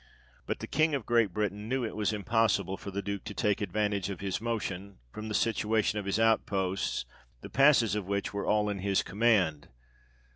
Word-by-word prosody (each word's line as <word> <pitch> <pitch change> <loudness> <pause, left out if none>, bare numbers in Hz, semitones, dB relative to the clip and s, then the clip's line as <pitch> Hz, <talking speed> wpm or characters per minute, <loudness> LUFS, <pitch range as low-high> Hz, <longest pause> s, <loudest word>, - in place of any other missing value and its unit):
But - - -3
the - - -3
King 155 +1 +2
of 130 -6 -4
Great 115 -4 +3
Britain 105 +2 -3
knew 130 -1 0
it 110 - -5
was 105 -1 0
impossible 105 -3 +1
for 100 - -8
the 100 +1 -4
Duke 100 0 -4
to 105 - -6
take 105 -1 +1
advantage 105 -2 -1
of 100 - -5
his 100 0 -3
motion, 100 -4 -3
from 110 - -7
the 105 - -3
situation 110 -1 +1
of 100 - -6
his 100 +2 0
outposts, 100 -4 +1 0.4
the - - -10
passes 135 -7 +5
of 105 -3 -2
which 100 0 -2
were 100 - -3
all 105 0 +2
in 100 -1 -2
his 100 0 +1
command. 95 -7 +2
105 Hz, 195 wpm, -30 LUFS, 100-110 Hz, 0.4 s, passes